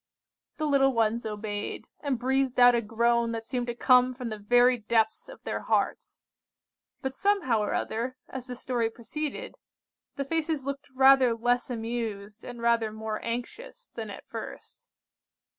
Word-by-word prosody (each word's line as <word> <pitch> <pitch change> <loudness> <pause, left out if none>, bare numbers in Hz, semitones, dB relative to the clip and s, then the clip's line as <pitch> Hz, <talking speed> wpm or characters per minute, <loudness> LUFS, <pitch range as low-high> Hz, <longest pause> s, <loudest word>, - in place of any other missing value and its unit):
The 310 - -1
little 275 -2 +4
ones 225 0 +1
obeyed, 210 -1 -4
and 280 -4 -1
breathed 260 +1 +1
out 245 0 +8
a 235 - +2
groan 235 +1 +1
that 225 0 -4
seemed 245 +1 -3
to 240 - -3
come 250 +1 +4
from 245 -2 -5
the 215 -1 -5
very 245 +4 +4
depths 225 - +1
of - - -12
their - - -3
hearts; - - -1 0.8
but 265 0 -2
somehow 370 - +2
or 210 - -1
other, 245 +4 -2
as 260 -1 -7
the 250 - -5
story 240 -2 -1
proceeded, 300 - -5 0.6
the 275 - -3
faces 315 -2 -1
looked 280 +1 -5
rather 265 -2 +6
less 245 +2 +1
amused, 225 -3 -4
and 240 -1 -8
rather 230 -2 +2
more 220 0 -5
anxious, 475 - -6
than - - -6
at - - -9
first. - - -9
245 Hz, 160 wpm, -28 LUFS, 225-265 Hz, 0.8 s, out